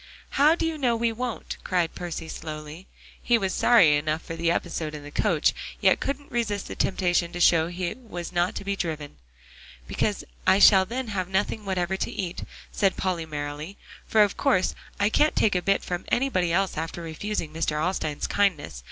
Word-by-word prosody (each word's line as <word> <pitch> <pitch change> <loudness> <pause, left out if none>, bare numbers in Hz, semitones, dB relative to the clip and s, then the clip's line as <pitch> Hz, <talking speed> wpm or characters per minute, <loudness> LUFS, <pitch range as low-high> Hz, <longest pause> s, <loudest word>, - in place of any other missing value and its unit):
"How 300 +4 +5
do 335 - -2
you 325 -1 -2
know 245 -4 +2
we 230 0 +1
won't?" 240 0 -4
cried 175 -3 0
Percy 175 -2 -5
slowly. 155 +2 -8 0.3
He 240 - +3
was 195 -4 -1
sorry 180 -12 +5
enough 155 +2 -2
for 165 - -6
the 165 0 0
episode 165 -2 -2
in 150 - -8
the 145 - -10
coach, - - +2 0.3
yet - - +4
couldn't 280 +1 -4
resist 210 -4 -1
the - - -6
temptation 175 -2 +1
to 175 - -5
show 165 -2 +5
he 175 0 -3
was 195 -9 -8
not 175 0 0
to - - -4
be 200 0 -1
driven. 155 - -4 0.7
"Because - - -1 0.2
I - - +6
shall 195 -1 +7
then 250 +1 -4
have 185 -3 -2
nothing 205 +2 -1
whatever 190 -1 -1
to - - -2
eat," 180 -2 -4 0.3
said 195 -2 +1
Polly 175 -4 -2
merrily, 150 +4 -5 0.3
"for 215 -1 +5
of 205 - -1
course 255 -10 +2 0.3
I 205 +1 +3
can't 300 +7 +2
take 215 - +3
a 180 - +1
bit 195 +2 +1
from 175 0 -4
anybody 235 -10 +1
else 190 0 +1
after 165 +2 -4
refusing 165 0 -4
Mr. 155 -2 -1
Alstyne's 155 -3 -1
kindness. 180 - 0
185 Hz, 190 wpm, -26 LUFS, 165-210 Hz, 0.7 s, shall